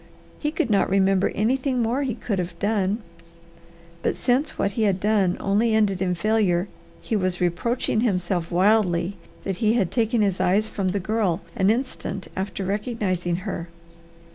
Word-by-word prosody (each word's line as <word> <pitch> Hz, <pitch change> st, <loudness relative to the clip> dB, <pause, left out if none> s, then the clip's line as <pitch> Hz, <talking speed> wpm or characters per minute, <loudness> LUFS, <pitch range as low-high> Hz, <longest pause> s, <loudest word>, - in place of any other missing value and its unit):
He 300 Hz, -, 0 dB
could 300 Hz, -7 st, -1 dB
not 200 Hz, -, +3 dB
remember 195 Hz, 0 st, +3 dB
anything 255 Hz, +4 st, +1 dB
more 240 Hz, +4 st, +1 dB
he 260 Hz, -5 st, -1 dB
could 215 Hz, -4 st, -2 dB
have 180 Hz, 0 st, -4 dB
done, 205 Hz, +1 st, 0 dB, 1.0 s
but -, -, 0 dB
since 265 Hz, +5 st, 0 dB
what 200 Hz, -, +1 dB
he 225 Hz, -, -3 dB
had 200 Hz, -3 st, +2 dB
done 200 Hz, -3 st, +2 dB
only 215 Hz, +3 st, +2 dB
ended 200 Hz, -4 st, +2 dB
in 180 Hz, -1 st, +1 dB
failure, 195 Hz, -2 st, +1 dB, 0.4 s
he 225 Hz, -, -1 dB
was 185 Hz, -3 st, 0 dB
reproaching 215 Hz, +6 st, 0 dB
himself 180 Hz, -6 st, 0 dB
wildly 185 Hz, -1 st, +2 dB, 0.3 s
that 195 Hz, -2 st, -3 dB
he 220 Hz, -2 st, +2 dB
had 205 Hz, -7 st, +1 dB
taken 230 Hz, -1 st, +1 dB
his 195 Hz, -2 st, 0 dB
eyes 205 Hz, +4 st, +2 dB
from 195 Hz, -3 st, -2 dB
the 195 Hz, +2 st, 0 dB
Girl 195 Hz, -3 st, 0 dB
an 190 Hz, +1 st, +3 dB
instant 225 Hz, -5 st, -2 dB
after 195 Hz, 0 st, -3 dB
recognizing 195 Hz, -4 st, -1 dB
her. 170 Hz, -4 st, -4 dB
200 Hz, 165 wpm, -24 LUFS, 185-225 Hz, 1.0 s, not